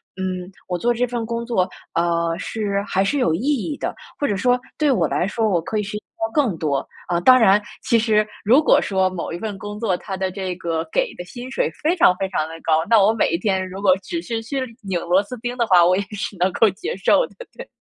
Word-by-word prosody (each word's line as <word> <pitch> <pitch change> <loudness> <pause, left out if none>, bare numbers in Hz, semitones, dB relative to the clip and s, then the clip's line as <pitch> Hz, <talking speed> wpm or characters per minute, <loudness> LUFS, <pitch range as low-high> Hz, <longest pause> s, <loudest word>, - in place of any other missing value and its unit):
嗯， 185 -1 -4 0.2
我 180 - -1
做 240 +6 +1
这 245 +2 +1
份 240 -2 -3
工 235 +1 -3
作， 190 -6 0 0.2
呃， 170 0 +1
是 200 -2 -2
还 190 +1 +1
是 285 +8 0
有 165 -10 +2
意 165 - -1
义 290 +1 0
的， - - -3 0.2
或 290 - -1
者 200 - -1
说 250 +3 +2 0.2
对 300 -2 +2
我 250 - +2
来 180 - 0
说 220 +1 0
我 175 -4 +1
可 215 +6 -3
以 210 - 0
学 210 +1 -5
习 - - -10 0.2
到 225 - -5
更 245 - +1
多。 145 -4 -1 0.2
啊， 175 -1 +1
当 255 +8 +7
然 210 -3 +5 0.2
其 230 - +3
实 215 -1 +2 0.2
如 255 +8 +6
果 - - +5
说 190 -1 +1
某 185 -2 -5
一 - - -3
份 210 -1 -4
工 205 +1 -7
作， 205 -6 +1
它 195 -2 -6
的 190 0 -2
这 185 -2 -4
个 165 -2 -3
给 - - 0
的 180 - -7
薪 245 +6 -9
水 - - 0
非 335 +4 +2
常 180 - +5
非 190 -1 -2
常 155 -4 -1
地 160 - -9
高， 160 0 +2
那 230 - +6
我 210 - +5
每 225 - +1
一 170 - +1
天 190 -1 -1
如 190 +2 -7
果 195 -2 +5
只 335 - -4
是 230 -5 -3
去 265 +5 -3 0.2
拧 190 -4 -2
螺 180 +3 +3
丝 250 +5 -8
钉 245 +2 -4
的 235 - +2
话， 180 -2 +6
我 185 +1 +3
也 - - +1
是 205 -1 -5
能 185 +1 +2
够 225 - +4
接 390 - -5
受 - - +3
的， - - -22 0.2
对。 - - -9
200 Hz, 275 characters per minute, -21 LUFS, 185-235 Hz, 0.2 s, 当